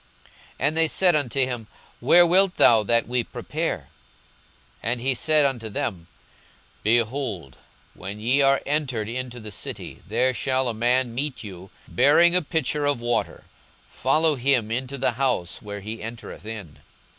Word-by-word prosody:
42:022:009 140 Hz, -, +2 dB
And 155 Hz, +2 st, 0 dB
they 165 Hz, 0 st, +5 dB
said 175 Hz, +1 st, +3 dB
unto 140 Hz, -2 st, -1 dB
him, 125 Hz, -4 st, -2 dB, 0.3 s
Where 175 Hz, +8 st, +6 dB
wilt 185 Hz, +2 st, +3 dB
thou 115 Hz, -2 st, +6 dB
that 115 Hz, +2 st, +1 dB
we 125 Hz, 0 st, 0 dB
prepare? -, -, -4 dB, 1.0 s
42:022:010 115 Hz, -, 0 dB
And 120 Hz, -1 st, -2 dB
he 130 Hz, +2 st, +1 dB
said 155 Hz, +3 st, +3 dB
unto 120 Hz, -5 st, -2 dB
them, 90 Hz, -4 st, -4 dB, 0.7 s
Behold, 115 Hz, -, -1 dB, 0.4 s
when 100 Hz, +3 st, -7 dB
ye 125 Hz, +6 st, +2 dB
are 135 Hz, 0 st, +3 dB
entered 135 Hz, -7 st, -1 dB
into 125 Hz, +1 st, -5 dB
the 110 Hz, -2 st, -8 dB
city, -, -, -6 dB
there 125 Hz, +5 st, +1 dB
shall 130 Hz, +2 st, 0 dB
a 120 Hz, -, -1 dB
man 120 Hz, +2 st, +1 dB
meet 135 Hz, +2 st, -3 dB
you, 95 Hz, -2 st, -10 dB, 0.2 s
bearing 155 Hz, +7 st, +4 dB
a 180 Hz, -, +4 dB
pitcher 150 Hz, -2 st, -1 dB
of 145 Hz, -4 st, +1 dB
water; 120 Hz, -1 st, -2 dB, 0.4 s
follow 160 Hz, 0 st, +2 dB
him 125 Hz, -4 st, +1 dB
into 130 Hz, +3 st, -3 dB
the 130 Hz, -, +1 dB
house 120 Hz, -8 st, -1 dB
where 105 Hz, -1 st, -7 dB
he 110 Hz, +3 st, -7 dB
entereth 115 Hz, -1 st, -8 dB
in. 95 Hz, -10 st, -8 dB
125 Hz, 160 wpm, -24 LUFS, 110-140 Hz, 1.0 s, Where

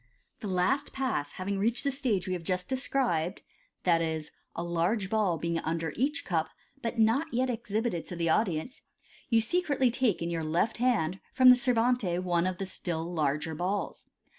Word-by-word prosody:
— -, -, -40 dB
The 210 Hz, -, -4 dB
last 195 Hz, +10 st, +1 dB
Pass 225 Hz, -, -2 dB
having 195 Hz, +1 st, -3 dB
reached 230 Hz, +4 st, +1 dB
the 280 Hz, -, +1 dB
stage 245 Hz, -, 0 dB
we 185 Hz, -, -1 dB
have 180 Hz, -, -3 dB
just 180 Hz, +2 st, -2 dB
described, 245 Hz, -, 0 dB, 0.4 s
i.e., 165 Hz, -3 st, +2 dB, 0.3 s
a 170 Hz, -, -3 dB
large 175 Hz, +4 st, 0 dB
ball 205 Hz, -6 st, +2 dB
being 170 Hz, +1 st, -1 dB
under 165 Hz, -1 st, -2 dB
each 285 Hz, +6 st, -1 dB
cup, 160 Hz, -4 st, 0 dB, 0.3 s
but 235 Hz, 0 st, -3 dB
not 225 Hz, +7 st, +3 dB
yet 255 Hz, +2 st, +1 dB
ex 235 Hz, -1 st, -7 dB
hibited 215 Hz, -5 st, -1 dB
to 180 Hz, -, -6 dB
the 170 Hz, -1 st, -1 dB
audience, 185 Hz, -, 0 dB, 0.5 s
you 230 Hz, -2 st, +5 dB
secretly 275 Hz, -1 st, +1 dB
take 245 Hz, -5 st, +1 dB
in 170 Hz, -, -2 dB
your 165 Hz, -1 st, -1 dB
lejt 165 Hz, +8 st, 0 dB
hand 210 Hz, -8 st, +1 dB
from 255 Hz, -1 st, +7 dB
the 250 Hz, -, +10 dB
servante 245 Hz, -6 st, +2 dB
one 175 Hz, -1 st, +1 dB
of 185 Hz, -1 st, -2 dB
the 195 Hz, -, -3 dB
still 175 Hz, -2 st, -4 dB
larger 150 Hz, 0 st, 0 dB
balls. 180 Hz, +6 st, -3 dB
190 Hz, 185 wpm, -29 LUFS, 170-245 Hz, 0.5 s, the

